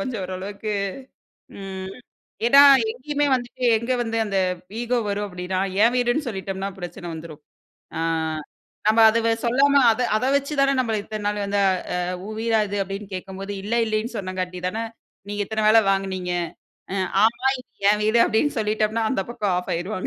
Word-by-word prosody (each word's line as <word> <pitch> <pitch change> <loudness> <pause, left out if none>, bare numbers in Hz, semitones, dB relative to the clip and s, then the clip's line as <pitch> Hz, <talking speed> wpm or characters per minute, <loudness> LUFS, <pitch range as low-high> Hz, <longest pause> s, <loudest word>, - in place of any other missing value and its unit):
கொஞ்சம் 255 -8 -3
ஓரளவுக்கு 200 +3 -5 0.9
ம். 190 -1 -6 0.5
ஏன்னா, 275 +4 +8 0.3
எங்கேயுமே 290 +4 -2
வந்துட்டு 250 0 -3
எங்க 235 +3 -3
வந்து 225 -1 -2
அந்த 200 -2 -1 0.4
ஈகோ 240 +1 0
வரும் 205 +1 -1
அப்டீனா 180 0 -4 0.2
என் 235 +2 +4
வீடுன்னு 245 +5 +1
சொல்லிட்டம்ன்னா 195 -2 -4
பிரச்சனை 175 -1 -7
வந்துரும். 160 -2 -9 0.6
ஆ, - - -2 0.9
நம்ம 220 +1 +4
அத 225 - +1
வ - - +3 0.2
சொல்லாம 280 +3 +4
அத 225 - -1 0.2
அத 250 - -1
வச்சு 280 +2 -1
தானே 275 0 +4
நம்மள 230 -4 0
இத்தன 215 0 -6
நாள் 210 0 -1
வந்து 200 0 0
அ - - +4 0.6
"உன் 215 0 -6
வீடா 225 -1 +2
இது?" 205 +1 -3
அப்பிடின்னு 195 +1 -7
கேட்கும்போது 195 +2 -6
இல்ல, 215 +4 -2
இல்லேன்னு 220 +2 -2
சொன்னங்காட்டி 185 -2 -4
தானே, 220 +5 -2 0.5
நீங்க 205 0 -4
இத்தன 220 +1 -1
வேல 225 +1 +7
வாங்குனீங்க. 190 -2 -1 0.6
அ - - -2 0.3
"ஆமா, 235 +4 +2
இது 250 - -20 0.2
என் 210 0 +2
வீடு." 220 +2 +3
அப்பிடின்னு 240 +4 +1
சொல்லிட்டம்ன்னா 215 +1 0
அந்த 260 - 0
பக்கம் 210 -6 -1
ஆஃப் 180 - -5
ஆயிருவாங்க. 185 +3 -3
215 Hz, 165 wpm, -23 LUFS, 195-235 Hz, 0.9 s, ஏன்னா